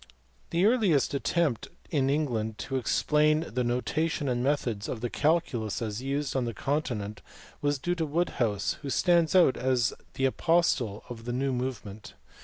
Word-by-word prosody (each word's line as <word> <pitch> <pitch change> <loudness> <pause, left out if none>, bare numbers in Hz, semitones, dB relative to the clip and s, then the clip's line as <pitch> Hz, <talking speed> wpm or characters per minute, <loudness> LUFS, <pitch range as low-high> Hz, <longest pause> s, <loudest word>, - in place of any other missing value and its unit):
The 170 +3 +2
earliest 205 - +3
attempt 145 -2 0 0.2
in 135 -4 +2
England 120 -7 -1
to 135 - -4
explain 150 +4 +2
the 125 -6 -2
notation 145 +5 -1
and 125 -1 0
methods 125 -7 -1
of 110 - -4
the 120 - -3
calculus 140 - 0
as 110 0 -4
used 140 +1 -2
on 130 -2 +1
the 115 -2 -4
continent 110 -7 -2 0.4
was 145 0 +1
due 175 +6 -1
to 165 -2 -1
Wood 170 +4 0
house, 105 -4 0
who 140 - -5
stands 170 +2 +3
out 175 -8 +5
as 125 -2 +1 0.2
the 135 - +1
apostle 135 -8 +1
of 115 -2 -9
the 120 - -3
new 135 +1 0
move 125 -3 -3
ment. 100 +1 -10
135 Hz, 170 wpm, -28 LUFS, 120-155 Hz, 0.4 s, out